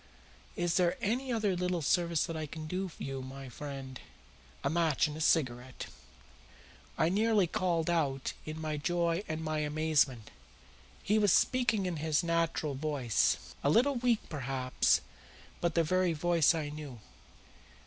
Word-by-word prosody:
"Is 175 -1 0
there 175 -2 +2
any 250 +5 -1
other 215 -5 +1
little 180 -2 -1
service 170 +2 +2
that 165 - -5
I 155 -1 -4
can 155 +1 -7
do 185 +4 -3
you, 135 -1 -5
my 135 0 -8
friend?" 135 -1 -7 0.6
"A - - +1
match 165 -4 +2
and 150 - -6
a 160 - -6
cigarette." 130 -5 0 1.1
I - - +3
nearly 210 +1 +3
called 170 -1 0
out 145 -6 0
in 155 +1 -6
my 155 -1 -3
joy 170 +2 0
and 155 0 -3
my 155 -1 -1
amazement. 150 -6 +1 0.7
He 215 +2 +2
was 205 -3 +4
speaking 225 -5 +2
in 180 -3 -2
his 155 +1 +1
natural 165 -3 0
voice 135 -5 0
a 140 - +3
little 250 - +4
weak, 240 -3 +1
perhaps, 130 -3 +1 0.6
but 170 -2 -1
the 165 - +4
very 185 +1 +2
voice 170 +1 +3
I 155 -2 -3
knew. 145 -5 -8
160 Hz, 150 wpm, -31 LUFS, 145-180 Hz, 1.1 s, was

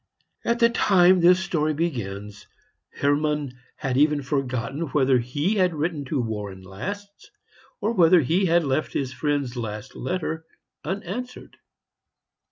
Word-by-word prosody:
At 235 - +1
the 235 0 +5
time 185 -4 +5
this 180 +1 +6
story 155 -4 0
begins, 105 - -4 0.4
Hermann 145 -1 0 0.2
had 135 -3 -2
even 150 0 +3
forgotten 135 +2 -2
whether 135 -2 +3
he 145 - -1
had 180 -3 +2
written 155 -1 -2
to 140 +1 -2
Warren 105 -5 -4
last, 200 - -7 0.5
or 230 - 0
whether 175 -3 +6
he 175 +8 +1
had 170 0 +3
left 140 +1 -1
his 130 -2 -2
friend's 140 -2 -1
last 110 0 -6
letter 160 +2 -3 0.4
unanswered. 200 +8 -5
150 Hz, 130 wpm, -24 LUFS, 130-180 Hz, 0.5 s, this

